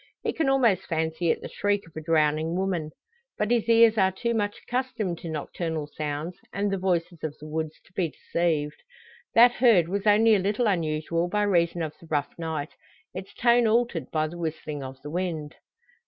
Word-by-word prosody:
He -, -, -1 dB
can 315 Hz, -4 st, +1 dB
almost 235 Hz, -9 st, +3 dB
fancy 160 Hz, 0 st, -1 dB
it -, -, +1 dB
the -, -, -6 dB
shriek 205 Hz, 0 st, -1 dB
of 165 Hz, -, -19 dB
a 155 Hz, -, -5 dB
drowning 155 Hz, +1 st, +1 dB
woman. 180 Hz, -4 st, -1 dB, 0.5 s
But 210 Hz, +2 st, 0 dB
his 235 Hz, -1 st, +1 dB
ears 230 Hz, -1 st, +6 dB
are 190 Hz, -1 st, +4 dB
too 235 Hz, +5 st, -2 dB
much 205 Hz, -2 st, -1 dB
accustomed 245 Hz, -8 st, -2 dB
to 170 Hz, -, -7 dB
nocturnal 160 Hz, 0 st, -3 dB
sounds, 150 Hz, +3 st, -5 dB
and 200 Hz, 0 st, -1 dB
the 195 Hz, -, -1 dB
voices 175 Hz, -2 st, -1 dB
of 155 Hz, -2 st, -4 dB
the 150 Hz, -, -11 dB
woods, 155 Hz, 0 st, -4 dB
to 175 Hz, -, -25 dB
be 175 Hz, -3 st, 0 dB
deceived. 155 Hz, -3 st, -2 dB, 0.5 s
That 240 Hz, +1 st, +8 dB
heard 230 Hz, -9 st, +4 dB
was 200 Hz, +3 st, -2 dB
only 220 Hz, +2 st, +6 dB
a 205 Hz, -, +4 dB
little 205 Hz, +5 st, 0 dB
unusual 165 Hz, -3 st, 0 dB
by 210 Hz, +3 st, +1 dB
reason 170 Hz, -4 st, +1 dB
of 155 Hz, -1 st, -4 dB
the 165 Hz, -, -15 dB
rough 145 Hz, -2 st, -1 dB
night 160 Hz, -3 st, -4 dB, 0.4 s
its 190 Hz, +1 st, -7 dB
tone 240 Hz, -1 st, +4 dB
altered 225 Hz, -6 st, +1 dB
by 155 Hz, -1 st, 0 dB
the 175 Hz, +2 st, -9 dB
whistling 155 Hz, -3 st, -4 dB
of 130 Hz, 0 st, -8 dB
the 150 Hz, -, -7 dB
wind. 165 Hz, -4 st, -3 dB
175 Hz, 195 wpm, -26 LUFS, 155-205 Hz, 0.5 s, That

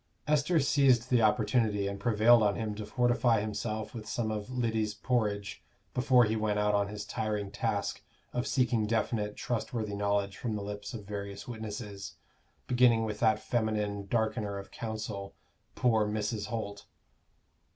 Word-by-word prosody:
Esther 150 Hz, +3 st, +3 dB
seized 135 Hz, -4 st, +3 dB
the 120 Hz, -2 st, +5 dB
opportunity 105 Hz, -2 st, +2 dB
and 100 Hz, 0 st, -4 dB
prevailed 115 Hz, +2 st, +5 dB
on 105 Hz, -2 st, +3 dB
him 110 Hz, -2 st, -2 dB
to 105 Hz, 0 st, -6 dB
fortify 120 Hz, 0 st, +3 dB
himself 110 Hz, +1 st, -3 dB
with 110 Hz, -3 st, -7 dB
some 115 Hz, -2 st, -1 dB
of 105 Hz, +1 st, -4 dB
Lyddy's 110 Hz, -4 st, -1 dB
porridge 105 Hz, -3 st, -1 dB, 0.3 s
before 125 Hz, -1 st, +5 dB
he 110 Hz, 0 st, +1 dB
went 105 Hz, -1 st, 0 dB
out 105 Hz, 0 st, +2 dB
on 100 Hz, -1 st, +2 dB
his 105 Hz, 0 st, -6 dB
tiring 105 Hz, -2 st, -2 dB
task -, -, -2 dB, 0.3 s
of 125 Hz, +2 st, -1 dB
seeking 120 Hz, -5 st, +2 dB
definite 105 Hz, -1 st, 0 dB
trustworthy 115 Hz, -3 st, -2 dB
knowledge 100 Hz, -1 st, 0 dB
from 115 Hz, -4 st, -2 dB
the 105 Hz, -, -3 dB
lips 105 Hz, +3 st, -6 dB
of 105 Hz, -3 st, -7 dB
various 100 Hz, 0 st, -6 dB
witnesses, 105 Hz, -4 st, -6 dB, 0.5 s
beginning 120 Hz, -2 st, +4 dB
with 105 Hz, -1 st, -4 dB
that 110 Hz, -2 st, +4 dB
feminine 105 Hz, -3 st, -1 dB
darkener 110 Hz, -2 st, 0 dB
of 100 Hz, -, -11 dB
counsel, 110 Hz, -3 st, -5 dB, 0.4 s
poor 110 Hz, -4 st, +3 dB
Mrs. 105 Hz, 0 st, -2 dB
Holt. 100 Hz, -3 st, -5 dB
110 Hz, 150 wpm, -30 LUFS, 105-120 Hz, 0.5 s, the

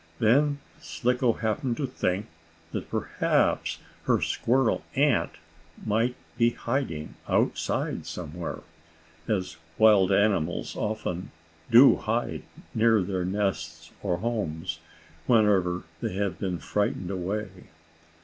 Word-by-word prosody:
Then 140 Hz, -, +3 dB, 0.2 s
Slicko 125 Hz, -1 st, +1 dB
happened 115 Hz, +3 st, -1 dB
to 145 Hz, -, -1 dB
think 100 Hz, -5 st, -1 dB, 0.5 s
that -, -, -5 dB
perhaps -, -, +1 dB, 0.3 s
her -, -, +3 dB
squirrel 125 Hz, -1 st, +1 dB
aunt 135 Hz, -, +2 dB, 0.5 s
might 115 Hz, +3 st, +1 dB, 0.2 s
be 115 Hz, 0 st, +5 dB
hiding 120 Hz, -, -3 dB, 0.2 s
outside -, -, 0 dB
somewhere, 85 Hz, 0 st, -5 dB, 0.7 s
as 90 Hz, -6 st, -1 dB, 0.2 s
wild 105 Hz, -4 st, +6 dB
animals 95 Hz, -5 st, +1 dB
often 95 Hz, -4 st, -3 dB, 0.4 s
do 120 Hz, +4 st, +8 dB
hide, 110 Hz, -, -2 dB, 0.3 s
near 110 Hz, -2 st, +4 dB
their 90 Hz, -1 st, -2 dB
nests, 85 Hz, -5 st, -2 dB
or 90 Hz, -3 st, 0 dB
homes, 90 Hz, -6 st, -3 dB, 0.5 s
whenever 100 Hz, -6 st, +3 dB, 0.2 s
they -, -, -2 dB
have 100 Hz, -1 st, -1 dB
been 95 Hz, -3 st, -2 dB
frightened 100 Hz, -1 st, -1 dB
away. 95 Hz, +3 st, -2 dB
105 Hz, 105 wpm, -27 LUFS, 90-115 Hz, 0.7 s, do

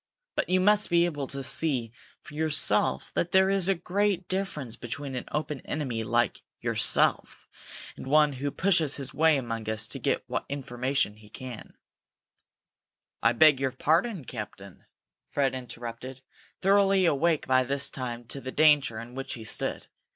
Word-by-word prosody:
But -, -, -1 dB
you 185 Hz, 0 st, +3 dB
must 210 Hz, +2 st, +3 dB
be 170 Hz, -1 st, +4 dB
able 145 Hz, -5 st, -3 dB
to 135 Hz, 0 st, -4 dB
see 130 Hz, -5 st, +1 dB, 0.3 s
for -, -, -13 dB
yourself 155 Hz, 0 st, +1 dB
that 175 Hz, -, -1 dB
there 190 Hz, 0 st, +4 dB
is 195 Hz, -1 st, +2 dB
a 195 Hz, -, +3 dB
great 190 Hz, +1 st, -1 dB
difference 185 Hz, -, -3 dB
between 130 Hz, +3 st, -6 dB
an 125 Hz, -, -4 dB
open 150 Hz, -2 st, -3 dB
enemy 125 Hz, -7 st, -3 dB
like 120 Hz, +1 st, 0 dB, 0.2 s
yourself -, -, +1 dB, 0.5 s
and -, -, -9 dB
one 150 Hz, +1 st, +4 dB
who 135 Hz, +2 st, -3 dB
pushes 165 Hz, -3 st, +2 dB
his 140 Hz, -2 st, -4 dB
way 160 Hz, -1 st, +4 dB
among 115 Hz, -4 st, -4 dB
us 110 Hz, +1 st, 0 dB
to -, -, -6 dB
get -, -, 0 dB
what -, -, -4 dB
information 130 Hz, -4 st, -2 dB
he 105 Hz, -1 st, -17 dB
can 125 Hz, -2 st, -9 dB, 0.7 s
" -, -, -62 dB
"I -, -, +4 dB
beg 155 Hz, -4 st, +6 dB
your 135 Hz, -1 st, 0 dB
pardon, 165 Hz, -, +1 dB
captain," 100 Hz, -5 st, -9 dB, 0.4 s
Fred 140 Hz, -2 st, 0 dB
interrupted, 125 Hz, 0 st, -8 dB, 0.4 s
thoroughly 195 Hz, -1 st, +4 dB
awake 165 Hz, 0 st, +2 dB
by 130 Hz, 0 st, +3 dB
this 140 Hz, +2 st, -2 dB
time 120 Hz, -2 st, -5 dB
to 140 Hz, -, -5 dB
the 130 Hz, -, -6 dB
danger 145 Hz, -6 st, +4 dB
in 115 Hz, +2 st, -8 dB
which 135 Hz, +1 st, -5 dB
he 115 Hz, -, -9 dB
stood. 110 Hz, -, -3 dB
140 Hz, 165 wpm, -27 LUFS, 125-165 Hz, 0.7 s, beg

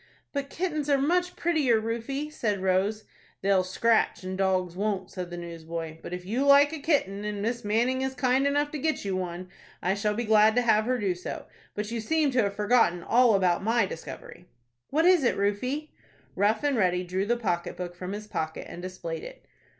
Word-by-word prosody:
"But 280 Hz, -1 st, -3 dB
kittens 310 Hz, -4 st, -2 dB
are 280 Hz, -, +4 dB
much 355 Hz, +6 st, +1 dB
prettier, 300 Hz, -9 st, +2 dB
Rufie," 235 Hz, +7 st, -3 dB
said 205 Hz, -9 st, -1 dB
Rose. 195 Hz, +3 st, +1 dB, 0.4 s
"They'll 195 Hz, -1 st, +3 dB
scratch, 220 Hz, +3 st, +1 dB
and 185 Hz, 0 st, -4 dB
dogs 185 Hz, -2 st, 0 dB
won't," 195 Hz, -1 st, -2 dB
said 180 Hz, -2 st, -5 dB
the 175 Hz, -, -7 dB
newsboy; 165 Hz, -1 st, -6 dB
"but -, -, -8 dB
if 180 Hz, 0 st, -5 dB
you 235 Hz, +8 st, 0 dB
like 280 Hz, +2 st, +6 dB
a 320 Hz, -, -4 dB
kitten, 240 Hz, -, 0 dB
and 210 Hz, -1 st, -3 dB
Miss 235 Hz, +2 st, -2 dB
Manning 235 Hz, +5 st, +1 dB
is 265 Hz, 0 st, -2 dB
kind 260 Hz, +2 st, +2 dB
enough 290 Hz, +1 st, +1 dB
to 300 Hz, -, -4 dB
get 310 Hz, -5 st, -1 dB
you 195 Hz, -1 st, -1 dB
one, 180 Hz, 0 st, -4 dB, 0.3 s
I 185 Hz, -, 0 dB
shall 210 Hz, +1 st, -1 dB
be 240 Hz, -, -1 dB
glad 215 Hz, 0 st, +5 dB
to 245 Hz, -, +3 dB
have 215 Hz, -2 st, +3 dB
her 255 Hz, +1 st, +1 dB
do 200 Hz, -5 st, 0 dB
so. 180 Hz, +1 st, -7 dB, 0.3 s
But 210 Hz, +1 st, -4 dB
you 230 Hz, -1 st, -2 dB
seem 310 Hz, +4 st, +1 dB
to 255 Hz, -1 st, +3 dB
have 200 Hz, -2 st, -1 dB
forgotten 205 Hz, -5 st, +2 dB
all 240 Hz, -2 st, +4 dB
about 180 Hz, -3 st, +2 dB
my 225 Hz, +2 st, +2 dB
discovery." 175 Hz, 0 st, -9 dB, 0.4 s
"What 320 Hz, +3 st, +2 dB
is 360 Hz, -4 st, +5 dB
it, 240 Hz, -, +2 dB
Rufie?" 250 Hz, +10 st, -1 dB, 0.4 s
Rough 210 Hz, +4 st, +2 dB
and 285 Hz, -3 st, +1 dB
Ready 180 Hz, -3 st, +2 dB
drew 185 Hz, +3 st, -2 dB
the 240 Hz, +1 st, +2 dB
pocket 175 Hz, -7 st, -2 dB
book 180 Hz, -1 st, -5 dB
from 180 Hz, +2 st, -6 dB
his 210 Hz, +1 st, -6 dB
pocket, 160 Hz, -6 st, -4 dB
and 175 Hz, -, -8 dB
displayed 175 Hz, -3 st, -6 dB
it. -, -, -11 dB
210 Hz, 205 wpm, -27 LUFS, 185-260 Hz, 0.4 s, like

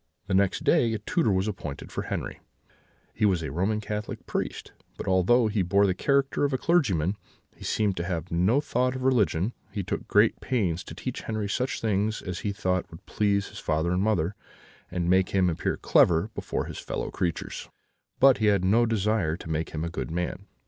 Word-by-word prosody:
"The 95 Hz, -, -3 dB
next 95 Hz, 0 st, +2 dB
day 115 Hz, -1 st, +3 dB
a -, -, -1 dB
tutor 110 Hz, -, 0 dB
was 95 Hz, +2 st, +1 dB
appointed 75 Hz, -8 st, -6 dB
for -, -, -4 dB
Henri: -, -, -4 dB, 0.7 s
he 110 Hz, -, -3 dB
was 95 Hz, -5 st, +3 dB
a 75 Hz, -, -4 dB
Roman 95 Hz, +8 st, 0 dB
Catholic 105 Hz, 0 st, -5 dB
priest; -, -, -4 dB, 0.3 s
but -, -, -6 dB
although 95 Hz, +6 st, +4 dB
he 110 Hz, -2 st, +1 dB
bore 100 Hz, +3 st, +3 dB
the 95 Hz, -, +2 dB
character 140 Hz, +7 st, +1 dB
of 145 Hz, -, +2 dB
a -, -, +2 dB
clergyman, 105 Hz, -, +1 dB, 0.4 s
he -, -, -13 dB
seemed 105 Hz, -3 st, 0 dB
to 85 Hz, -, -1 dB
have 85 Hz, -1 st, -4 dB
no 95 Hz, +11 st, +3 dB
thought 125 Hz, -3 st, 0 dB
of 130 Hz, -, -4 dB
religion; 115 Hz, -5 st, +2 dB, 0.2 s
he 100 Hz, -, -3 dB
took 95 Hz, -, -4 dB
great 105 Hz, +2 st, +4 dB
pains 95 Hz, -10 st, -1 dB
to -, -, -9 dB
teach 130 Hz, -, -5 dB
Henri 110 Hz, -2 st, -3 dB
such 125 Hz, +6 st, -2 dB
things 110 Hz, 0 st, 0 dB
as 90 Hz, -2 st, -4 dB
he 105 Hz, -, -2 dB
thought 95 Hz, -3 st, -1 dB
would 80 Hz, -, -13 dB
please 100 Hz, -1 st, 0 dB
his -, -, -9 dB
father 80 Hz, +2 st, 0 dB
and 90 Hz, +1 st, +1 dB
mother, 100 Hz, -4 st, +1 dB, 0.6 s
and 90 Hz, -1 st, -2 dB
make 95 Hz, +1 st, +3 dB
him 90 Hz, -2 st, +3 dB
appear 80 Hz, -, -2 dB
clever 85 Hz, +5 st, +3 dB
before -, -, -3 dB
his -, -, -7 dB
fellow -, -, -4 dB
creatures, 85 Hz, -3 st, -3 dB, 0.5 s
but 135 Hz, -1 st, +6 dB
he 110 Hz, -, +2 dB
had 100 Hz, -3 st, +3 dB
no 115 Hz, +5 st, +4 dB
desire 105 Hz, -6 st, +1 dB
to 80 Hz, -, -7 dB
make 80 Hz, +1 st, -1 dB
him 80 Hz, 0 st, -4 dB
a -, -, -3 dB
good -, -, -4 dB
man. 85 Hz, +1 st, -3 dB
100 Hz, 205 wpm, -27 LUFS, 90-110 Hz, 0.7 s, but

